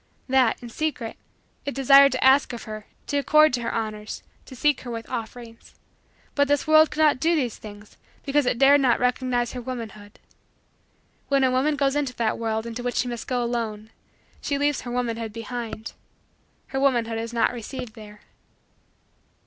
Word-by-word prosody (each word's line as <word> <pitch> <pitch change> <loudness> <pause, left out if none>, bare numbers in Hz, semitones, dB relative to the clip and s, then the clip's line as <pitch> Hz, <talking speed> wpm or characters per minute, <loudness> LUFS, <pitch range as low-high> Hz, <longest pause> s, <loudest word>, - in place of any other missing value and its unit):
That, 260 -3 +2
in 240 - -7
secret, 260 -4 -3 0.5
it 280 - -4
desired 275 +1 +7
to 255 - -1
ask 265 0 +5
of 235 - -7
her; 215 -1 -8 0.2
to 285 - 0
accord 305 +1 +5
to 245 - -1
her 230 - -2
honors; 215 -1 -4 0.2
to 260 - -10
seek 295 +2 +1
her 245 - -8
with 230 -1 -6
offerings. 230 0 -8 0.6
But 285 -1 +2
this 290 0 +1
world 310 0 +6
could 310 - -3
not 295 -4 +4
do 330 +4 +2
these 250 -8 -1
things 205 -1 -12 0.3
because 285 -1 +1
it 245 - +1
dared 275 +2 +6
not 250 -3 +3
recognize 250 -1 0
her 250 - -5
womanhood. 225 -4 -8 1.1
When 275 -1 +2
a 260 - +3
woman 275 +4 +1
goes 280 -1 +1
into 280 -4 -1
that 225 -1 -1
world 220 -1 -2
into 235 +1 -5
which 245 0 -3
she 250 - 0
must 240 -1 -5
go 250 -1 0
alone, 225 -2 -3 0.5
she 285 - -1
leaves 290 0 0
her 245 - -7
womanhood 230 -2 -2
behind. 230 -1 -6 0.8
Her 270 - -2
womanhood 235 -5 +1
is 230 0 -5
not 235 +1 +1
received 240 0 -7
there. 210 -2 -13
245 Hz, 180 wpm, -24 LUFS, 230-275 Hz, 1.1 s, desired